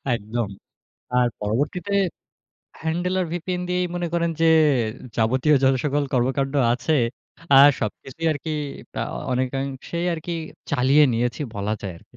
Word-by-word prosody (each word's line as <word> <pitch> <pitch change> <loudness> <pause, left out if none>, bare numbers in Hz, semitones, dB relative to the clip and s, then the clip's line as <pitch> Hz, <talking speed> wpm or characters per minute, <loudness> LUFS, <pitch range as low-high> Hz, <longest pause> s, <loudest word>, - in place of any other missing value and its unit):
একদম। 110 0 -3 0.7
আর 125 - +4
পরবর্তীতে 145 - -1 0.9
হ্যান্ডেল 175 +3 -1
আর 180 - 0
ভিপিএন 180 +1 -3
দিয়েই 180 0 +1
মনে 175 0 -1
করেন 170 -1 +1
যে, - - +5 0.7
যাবতীয় 130 +7 +3
যত 135 0 +5
সকল 145 0 +1
কর্মকান্ড 135 +2 +1 0.2
আছে। 130 +6 0 0.6
আর 140 +1 +10
সবকিছুই 135 +9 -4
আরকি 155 +2 -5 0.5
আ - - +1 0.3
অনেকাংশেই 135 +6 -2
আরকি 165 +1 -5 0.4
চালিয়ে 140 +2 +5
নিয়েছি 120 +4 -1 0.2
বলা 100 +2 -1
যায় 95 -3 -5
আরকি। - - -23
140 Hz, 130 wpm, -23 LUFS, 125-165 Hz, 0.9 s, আর